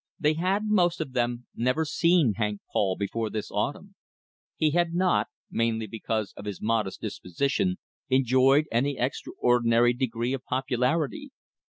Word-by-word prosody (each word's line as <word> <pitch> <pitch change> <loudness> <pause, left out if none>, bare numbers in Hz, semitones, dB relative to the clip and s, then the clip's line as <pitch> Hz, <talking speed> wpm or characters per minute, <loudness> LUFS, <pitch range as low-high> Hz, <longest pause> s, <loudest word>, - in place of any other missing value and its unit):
They 150 -1 +3
had, 185 +6 0
most 180 -5 +2
of 155 -5 -4
them, 120 -1 -1
never 125 +7 +1
seen 165 -6 +3
Hank 105 -2 -1
Paul 95 -3 +1
before 110 +2 -2
this 105 0 -5
autumn. 145 - -3 0.6
He 155 -1 +2
had 170 +1 +1
not, 175 - +2 0.2
mainly 115 -1 0
because 110 0 -3
of 100 - -9
his 105 -2 -5
modest 110 -3 -1
disposition, 140 - -1 0.3
enjoyed 130 +3 +4
any 135 +4 +1
extraordinary 120 -2 +2
degree 120 0 -2
of 135 -1 -4
popularity. 135 - -1
125 Hz, 140 wpm, -27 LUFS, 115-155 Hz, 0.6 s, enjoyed